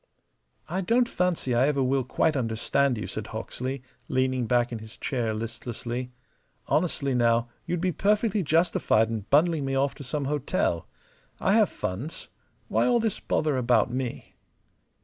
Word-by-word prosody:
"I 180 +4 -2
don't 235 +6 +3
fancy 180 - 0
I 125 +3 +4
ever 140 -2 +1
will 130 +1 +1
quite 150 +5 +1
understand 125 +2 +1
you," 110 - -4
said 110 0 -5
Hawksley, 125 +4 -5 0.2
leaning 130 -2 0
back 120 +1 +2
in 115 - -4
his 110 0 -11
chair, 120 -4 -1
listlessly. 120 +2 -5 0.5
"Honestly, 150 -4 0
now, 120 -1 +2 0.2
you'd 175 0 -1
be 185 0 +1
perfectly 210 +3 +2
justified 160 -9 +2
in 110 -3 -4
bundling 155 +1 +4
me 135 0 -1
off 135 +1 +1
to - - -10
some 140 +2 -2
hotel. 135 - 0 0.5
I 190 - +2
have 215 -2 +5
funds. 115 - -5 0.4
Why - - +2
all 245 -1 +4
this 225 -3 -1
pother 150 -3 0
about 120 -2 +3
me?" 130 -2 -4
130 Hz, 155 wpm, -27 LUFS, 120-160 Hz, 0.5 s, have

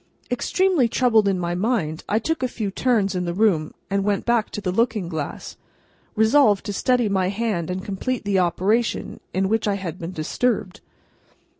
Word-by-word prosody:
Extremely 340 +2 +2
troubled 225 -3 +3
in 195 -1 +2
my 175 -1 -2
mind, 180 -5 -1
I 210 - +2
took 320 +8 -1
a 255 - +1
few 215 -5 -4
turns 215 -3 +1
in 180 -1 -2
the 170 0 -3
room, 185 -7 +1
and 200 0 0
went 205 0 0
back 235 -2 +2
to - - -5
the 185 -3 -2
looking 220 -2 0
glass, 160 -4 -5 0.6
resolved 220 -1 +4
to 205 - -3
steady 245 +2 +2
my 190 -2 +1
hand 200 -5 -2
and 185 +1 -4
complete 215 +5 -3
the 200 -2 +2
operation 195 +6 0
in 190 +1 0
which 220 +1 0
I 200 - +1
had 185 -3 -5
been 170 +1 -5
disturbed. 190 +4 -1
205 Hz, 180 wpm, -23 LUFS, 185-230 Hz, 0.6 s, resolved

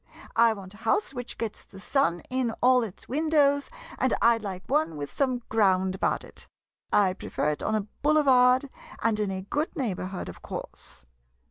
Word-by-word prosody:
I 230 -1 +5
want 195 -2 -10
a - - -14
house 225 - 0
which 245 -2 -6
gets 220 -2 -4
the 195 - -14
sun 200 -6 0
in 255 -3 0
all 250 0 +5
its 215 -6 -7
windows, 285 0 +2 0.3
and 260 -1 +2
I 235 0 +4
'd - - -14
like 190 -2 -5
one 285 - 0
with 145 -1 -5
some 255 -3 0
ground 190 -4 +2
about 190 - 0
it. - - -12 0.4
I 195 -3 +4
prefer 150 -5 -2
it 150 - -5
on 220 - 0
a 210 -1 -2
boule 305 +1 +4
vard, 255 0 +5 0.4
and 225 -2 +2
in 210 -2 0
a 190 -1 -4
good 295 - -2
neighborhood, 190 - -3
of 90 - -9
course. - - -9
225 Hz, 190 wpm, -27 LUFS, 190-260 Hz, 0.4 s, I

